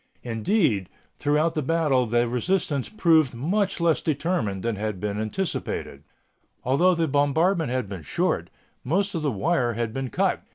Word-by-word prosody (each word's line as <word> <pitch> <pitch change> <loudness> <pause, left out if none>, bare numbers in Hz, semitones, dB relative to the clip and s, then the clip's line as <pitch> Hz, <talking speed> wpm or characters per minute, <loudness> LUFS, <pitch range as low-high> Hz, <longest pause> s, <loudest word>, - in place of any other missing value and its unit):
Indeed, 115 - +1 0.3
throughout 150 +3 +2
the 155 - -1
battle 140 -4 +1
the 120 +2 +2
resistance 140 +2 -1
proved 160 - +3
much 190 - 0
less 170 -2 +2
determined 140 - -1
than 115 -2 -1
had 105 -1 -3
been 105 +1 -3
anticipated. 110 - -3 0.6
Although 170 +9 +3
the 165 -1 +1
bombardment 155 +4 +2
had 125 -3 -1
been 95 -3 -7
short, 75 - -1 0.3
most 195 +8 0
of 165 - -2
the 150 - 0
wire 125 - 0
had 115 -1 -3
been 135 0 -3
cut. - - 0
140 Hz, 155 wpm, -25 LUFS, 115-165 Hz, 0.6 s, proved